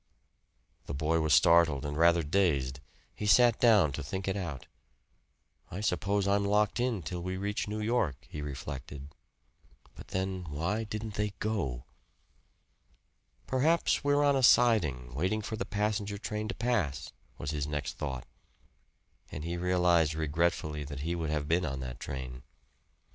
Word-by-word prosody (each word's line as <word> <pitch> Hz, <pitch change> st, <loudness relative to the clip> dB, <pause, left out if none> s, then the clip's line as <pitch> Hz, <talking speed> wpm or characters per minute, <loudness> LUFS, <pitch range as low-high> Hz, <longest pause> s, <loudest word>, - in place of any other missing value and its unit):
The 70 Hz, -, -4 dB
boy 80 Hz, +3 st, +1 dB
was 80 Hz, -1 st, 0 dB
startled 80 Hz, -4 st, +5 dB
and 75 Hz, 0 st, -3 dB
rather 85 Hz, +1 st, +4 dB
dazed. 70 Hz, -6 st, +1 dB, 0.3 s
He 105 Hz, -, -4 dB
sat 120 Hz, +1 st, +5 dB
down 105 Hz, -, +5 dB
to 75 Hz, -, -5 dB
think 95 Hz, +8 st, -5 dB
it 95 Hz, -, 0 dB
out. 85 Hz, -10 st, -5 dB, 1.0 s
"I 90 Hz, -, -6 dB
suppose 100 Hz, +1 st, 0 dB
I'm 100 Hz, 0 st, +2 dB
locked 105 Hz, +3 st, +2 dB
in 120 Hz, -7 st, 0 dB
till 90 Hz, +3 st, -4 dB
we 90 Hz, +1 st, -3 dB
reach 100 Hz, +2 st, -2 dB
New 105 Hz, +1 st, -3 dB
York," 105 Hz, -, -1 dB
he 75 Hz, -, -7 dB
reflected. 70 Hz, 0 st, -7 dB, 0.8 s
But -, -, -12 dB
then, 95 Hz, -1 st, -3 dB
why 90 Hz, +10 st, -2 dB
didn't 110 Hz, 0 st, -5 dB
they 105 Hz, 0 st, -2 dB
go? 70 Hz, -, -2 dB, 1.6 s
"Perhaps 155 Hz, +6 st, +2 dB
we're 145 Hz, 0 st, +3 dB
on 140 Hz, -1 st, +4 dB
a 135 Hz, -, +2 dB
siding, 80 Hz, -, +4 dB
waiting 95 Hz, +10 st, -1 dB
for 110 Hz, -, -4 dB
the 100 Hz, -, -3 dB
passenger 105 Hz, 0 st, -1 dB
train 105 Hz, +1 st, -4 dB
to -, -, -4 dB
pass," 105 Hz, -, -1 dB, 0.3 s
was 70 Hz, -, -4 dB
his 75 Hz, -2 st, -2 dB
next 75 Hz, -2 st, -3 dB
thought; 65 Hz, -4 st, -4 dB, 1.1 s
and 75 Hz, -, -6 dB
he 85 Hz, +1 st, -3 dB
realized 85 Hz, -3 st, +2 dB
regretfully 80 Hz, -1 st, -1 dB
that 70 Hz, -1 st, -7 dB
he 85 Hz, +4 st, -2 dB
would 85 Hz, -3 st, -2 dB
have 75 Hz, -1 st, -1 dB
been 85 Hz, +3 st, +2 dB
on 70 Hz, -3 st, -3 dB
that 60 Hz, -1 st, -6 dB
train. 65 Hz, -2 st, -6 dB
85 Hz, 155 wpm, -30 LUFS, 75-105 Hz, 1.6 s, startled